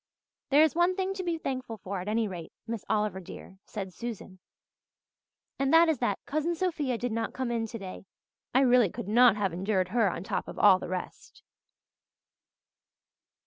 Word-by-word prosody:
"There 290 Hz, +2 st, +6 dB
is 315 Hz, -, +3 dB
one 345 Hz, +2 st, +2 dB
thing 380 Hz, 0 st, -1 dB
to 385 Hz, -1 st, -5 dB
be 340 Hz, -2 st, -1 dB
thankful 255 Hz, -6 st, -4 dB
for 195 Hz, -1 st, -5 dB
at 180 Hz, -, -7 dB
any 220 Hz, +1 st, +1 dB
rate, 175 Hz, -4 st, -7 dB
Miss 230 Hz, -2 st, -4 dB
Oliver, 210 Hz, -3 st, 0 dB
dear," 190 Hz, +1 st, -11 dB
said 195 Hz, -4 st, -6 dB
Susan, 215 Hz, -5 st, -7 dB, 1.2 s
"and 275 Hz, 0 st, +1 dB
that 330 Hz, +1 st, +7 dB
is 310 Hz, -6 st, +1 dB
that 210 Hz, -5 st, 0 dB
Cousin 310 Hz, +4 st, -1 dB
Sophia 315 Hz, -8 st, -1 dB
did 245 Hz, +1 st, -3 dB
not 225 Hz, 0 st, -2 dB
come 260 Hz, -2 st, -2 dB
in 230 Hz, -1 st, -1 dB
today. 195 Hz, -4 st, -8 dB, 0.4 s
I 260 Hz, -, +4 dB
really 250 Hz, -5 st, +5 dB
could 180 Hz, -, -7 dB
not 235 Hz, +1 st, +6 dB
have 200 Hz, -4 st, -1 dB
endured 185 Hz, 0 st, 0 dB
her 220 Hz, -1 st, +2 dB
on 170 Hz, -, -5 dB
top -, -, -3 dB
of -, -, -8 dB
all 195 Hz, -3 st, +6 dB
the -, -, -7 dB
rest." 185 Hz, 0 st, -7 dB
230 Hz, 180 wpm, -29 LUFS, 195-275 Hz, 1.2 s, that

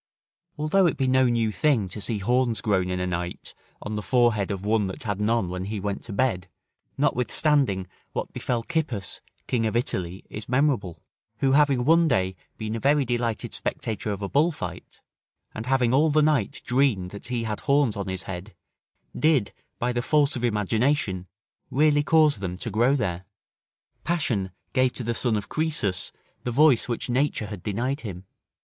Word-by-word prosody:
Although 160 Hz, +5 st, +3 dB
it 165 Hz, -, -1 dB
be 135 Hz, -, +1 dB
no 130 Hz, 0 st, +4 dB
new 115 Hz, -2 st, +1 dB
thing 120 Hz, -5 st, +2 dB
to 105 Hz, -, -6 dB
see 110 Hz, +1 st, -1 dB
horns 120 Hz, +1 st, +1 dB
grown 95 Hz, -4 st, +1 dB
in 90 Hz, 0 st, -1 dB
a 90 Hz, -, -1 dB
night 90 Hz, -1 st, -4 dB, 0.3 s
on 105 Hz, 0 st, -4 dB
the 105 Hz, -, -2 dB
forehead 110 Hz, -1 st, +2 dB
of 100 Hz, -1 st, -4 dB
one 105 Hz, -1 st, +2 dB
that 95 Hz, +9 st, -6 dB
had 105 Hz, -3 st, -2 dB
none 110 Hz, -2 st, +1 dB
when 90 Hz, +1 st, -4 dB
he 105 Hz, +1 st, -3 dB
went 100 Hz, 0 st, -3 dB
to 115 Hz, -, -8 dB
bed, 100 Hz, -4 st, 0 dB, 0.5 s
notwithstanding, 125 Hz, -4 st, +2 dB, 0.3 s
what -, -, -4 dB
befell 120 Hz, -2 st, -2 dB
Cippus, 135 Hz, -, -2 dB, 0.2 s
King 115 Hz, -3 st, 0 dB
of 110 Hz, -, -3 dB
Italy, 95 Hz, -6 st, -2 dB
is 105 Hz, +1 st, -8 dB
memorable; 125 Hz, -, +1 dB, 0.3 s
who 135 Hz, -, +2 dB
having 140 Hz, -3 st, +4 dB
one 165 Hz, +2 st, +5 dB
day 95 Hz, -8 st, +1 dB, 0.2 s
been 110 Hz, 0 st, -3 dB
a -, -, -2 dB
very 140 Hz, +2 st, +3 dB
delighted 120 Hz, -2 st, -2 dB
spectator 110 Hz, -1 st, -3 dB
of 100 Hz, 0 st, -4 dB
a -, -, -1 dB
bullfight, 140 Hz, -, -1 dB, 0.5 s
and 110 Hz, +2 st, -6 dB
having 130 Hz, -2 st, +2 dB
all 150 Hz, +4 st, +4 dB
the 155 Hz, +1 st, +3 dB
night 145 Hz, -9 st, +1 dB
dreamed 120 Hz, -8 st, +1 dB
that 100 Hz, -, -8 dB
he 120 Hz, -2 st, -2 dB
had 110 Hz, -2 st, -3 dB
horns 140 Hz, -6 st, +2 dB
on 100 Hz, -1 st, -4 dB
his 95 Hz, -2 st, -4 dB
head, 95 Hz, +3 st, -7 dB, 0.6 s
did, 150 Hz, -9 st, +2 dB, 0.2 s
by 125 Hz, +1 st, -1 dB
the 120 Hz, -, 0 dB
force 145 Hz, +2 st, +2 dB
of 120 Hz, -, -4 dB
imagination, 110 Hz, -2 st, +1 dB, 0.4 s
really 145 Hz, +1 st, +3 dB
cause 155 Hz, -5 st, +4 dB
them 90 Hz, -2 st, -4 dB
to 115 Hz, +4 st, -5 dB
grow 120 Hz, +7 st, +3 dB
there. 95 Hz, -8 st, -2 dB, 0.8 s
Passion 125 Hz, -, 0 dB, 0.2 s
gave 130 Hz, -1 st, +3 dB
to 125 Hz, -, -3 dB
the 115 Hz, +1 st, -1 dB
son 115 Hz, -1 st, +1 dB
of 105 Hz, -, -5 dB
Croesus 150 Hz, -, -1 dB, 0.3 s
the -, -, -2 dB
voice 135 Hz, 0 st, +4 dB
which 120 Hz, -2 st, -2 dB
nature 130 Hz, -2 st, 0 dB
had 105 Hz, -3 st, -7 dB
denied 125 Hz, -, -2 dB
him. 95 Hz, -4 st, -7 dB
115 Hz, 180 wpm, -25 LUFS, 100-135 Hz, 0.8 s, one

